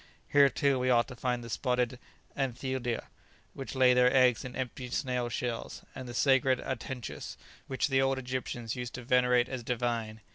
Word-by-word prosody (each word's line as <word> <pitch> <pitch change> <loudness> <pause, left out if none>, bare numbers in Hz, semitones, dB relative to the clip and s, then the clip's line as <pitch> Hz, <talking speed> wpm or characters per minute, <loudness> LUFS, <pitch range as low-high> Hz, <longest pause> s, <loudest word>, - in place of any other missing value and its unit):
Here, 140 -1 +6
too, 140 0 +1
we 130 0 +1
ought 120 -1 +4
to 125 - -8
find 125 0 -2
the 115 - -8
spotted 125 0 0 0.4
anthidia, 130 -3 -2 0.5
which 135 0 -7
lay 130 -1 +6
their 125 0 +5
eggs 130 -3 +4
in 125 - -7
empty 125 0 -4
snail 125 -2 -1
shells; 120 0 -4
and 130 -2 -7
the 120 - -7
sacred 130 -1 +3
atenchus, 130 -1 -5 0.3
which 130 +1 0
the 135 -1 +2
old 135 0 +2
Egyptians 125 -3 -4
used 125 -1 -5
to 125 - -7
venerate 125 0 +3
as 130 -2 -4
divine." 115 -2 -2
125 Hz, 175 wpm, -30 LUFS, 120-130 Hz, 0.5 s, Here